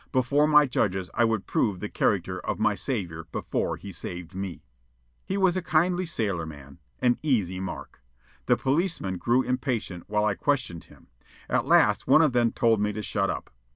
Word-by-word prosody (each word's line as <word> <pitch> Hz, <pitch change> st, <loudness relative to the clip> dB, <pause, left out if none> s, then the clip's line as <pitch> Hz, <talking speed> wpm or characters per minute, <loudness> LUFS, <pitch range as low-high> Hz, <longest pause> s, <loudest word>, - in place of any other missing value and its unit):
Before 140 Hz, +3 st, +2 dB
my 150 Hz, -1 st, +6 dB
judges 95 Hz, -7 st, -1 dB
I 120 Hz, -, +3 dB
would 110 Hz, -3 st, -1 dB
prove 100 Hz, -5 st, 0 dB
the -, -, -4 dB
character -, -, 0 dB
of -, -, -3 dB
my -, -, +2 dB
savior 85 Hz, -10 st, -3 dB
before -, -, -2 dB
he 100 Hz, -, -9 dB
saved 85 Hz, -1 st, -7 dB
me. 95 Hz, -5 st, -6 dB, 0.6 s
He 195 Hz, -, -1 dB
was 190 Hz, -2 st, +3 dB
a 185 Hz, -, 0 dB
kindly 175 Hz, +2 st, +1 dB
sailorman 80 Hz, -, -4 dB, 0.2 s
an 120 Hz, -1 st, +3 dB
"easy 105 Hz, -, 0 dB
mark." 95 Hz, -7 st, -7 dB, 0.5 s
The 120 Hz, -, +4 dB
policemen 135 Hz, -, -1 dB
grew 120 Hz, +2 st, +2 dB
impatient 125 Hz, -8 st, -2 dB
while 105 Hz, 0 st, +1 dB
I 105 Hz, -, +2 dB
questioned 125 Hz, -, -1 dB
him. -, -, -20 dB, 0.4 s
At -, -, +1 dB
last -, -, +4 dB
one 160 Hz, -, +6 dB
of 150 Hz, -5 st, +2 dB
them 120 Hz, -2 st, +3 dB
told 115 Hz, -4 st, +2 dB
me 105 Hz, 0 st, +1 dB
to 105 Hz, +1 st, -5 dB
shut 100 Hz, -2 st, 0 dB
up. 90 Hz, -, -5 dB
110 Hz, 180 wpm, -26 LUFS, 95-135 Hz, 0.6 s, my